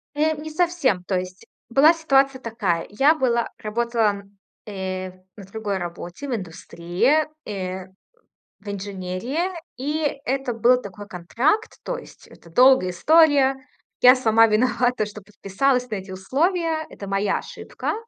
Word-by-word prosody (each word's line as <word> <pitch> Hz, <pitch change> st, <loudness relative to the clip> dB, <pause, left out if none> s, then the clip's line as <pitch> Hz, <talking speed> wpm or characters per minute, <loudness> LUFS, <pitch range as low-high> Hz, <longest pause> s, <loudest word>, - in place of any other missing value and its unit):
Э, 310 Hz, +1 st, +1 dB
не 315 Hz, +1 st, -7 dB
совсем, 310 Hz, -, +1 dB
то 190 Hz, -1 st, -1 dB
есть 185 Hz, 0 st, -8 dB, 0.2 s
была 280 Hz, +7 st, +6 dB
ситуация 275 Hz, -5 st, +2 dB
такая: 200 Hz, -8 st, -2 dB
я 275 Hz, +10 st, +3 dB
была 240 Hz, -5 st, 0 dB
работала 225 Hz, 0 st, 0 dB
на, 200 Hz, 0 st, -11 dB, 0.4 s
э, 185 Hz, -1 st, -4 dB, 0.3 s
на 200 Hz, -, -10 dB
другой 200 Hz, 0 st, -4 dB
работе, 175 Hz, +8 st, -7 dB
в 250 Hz, -, -1 dB
индустрии, 185 Hz, -, -1 dB, 0.2 s
э, 185 Hz, -2 st, -5 dB, 0.7 s
в 205 Hz, 0 st, -10 dB
инженерии. 200 Hz, -, -3 dB, 0.3 s
И 290 Hz, +1 st, -2 dB
это 265 Hz, -1 st, -1 dB
был 245 Hz, +3 st, +3 dB
такой 200 Hz, +1 st, -10 dB
контракт, 235 Hz, -, -1 dB
то -, -, -3 dB
есть 485 Hz, -, -14 dB
это 170 Hz, -, -17 dB
долгая 250 Hz, -3 st, +5 dB
история. 285 Hz, -, +4 dB, 0.5 s
Я 250 Hz, +1 st, +8 dB
сама 225 Hz, -2 st, +4 dB
виновата, 240 Hz, +1 st, +1 dB
что 210 Hz, 0 st, -10 dB
подписалась 245 Hz, +6 st, -1 dB
на 215 Hz, -, -3 dB
эти 190 Hz, 0 st, -7 dB
условия. 315 Hz, -, -1 dB
Это 200 Hz, -, -9 dB
моя 195 Hz, +1 st, 0 dB
ошибка. -, -, -5 dB
230 Hz, 140 wpm, -23 LUFS, 195-275 Hz, 0.7 s, Я